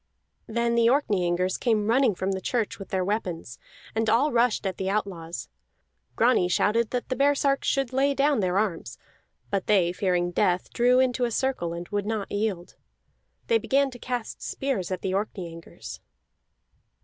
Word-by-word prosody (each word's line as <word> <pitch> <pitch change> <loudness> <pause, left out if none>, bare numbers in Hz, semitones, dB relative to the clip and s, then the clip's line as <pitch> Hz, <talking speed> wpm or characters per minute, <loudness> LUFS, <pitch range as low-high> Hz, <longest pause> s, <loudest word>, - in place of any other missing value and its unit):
Then 235 +1 0
the 235 -1 +4
Orkneyingers 185 -9 +1
came 220 -4 +1
running 235 -2 +3
from 190 +2 -2
the 190 -1 -3
church 230 +1 -2
with 195 - -9
their 185 -1 0
weapons, 180 - -3 0.3
and 225 0 0
all 270 +7 +3
rushed 235 -3 +2
at 190 -1 -2
the 190 0 -2
outlaws. 180 -5 -3 0.7
Grani 230 -6 +3
shouted 215 +5 +2
that 250 0 -3
the 255 - 0
baresarks 280 0 +2
should 270 -2 0
lay 275 +2 +2
down 280 -1 +2
their 185 -1 +1
arms; 175 - -2 0.5
but 195 -2 -1
they, 185 -5 +3
fearing 180 -2 0
death, 180 +1 0
drew 250 +1 +4
into 255 -1 +2
a - - -1
circle 235 -8 -1
and 170 +1 -6
would 205 -1 -2
not 215 -2 -3
yield. 205 -4 -2 0.7
They 460 -1 +3
began 275 -5 +1
to 245 - -11
cast 245 -1 -4
spears 265 -10 -2
at 185 - -3
the 190 - -1
Orkneyingers. 180 -5 -5
215 Hz, 165 wpm, -26 LUFS, 185-250 Hz, 0.7 s, the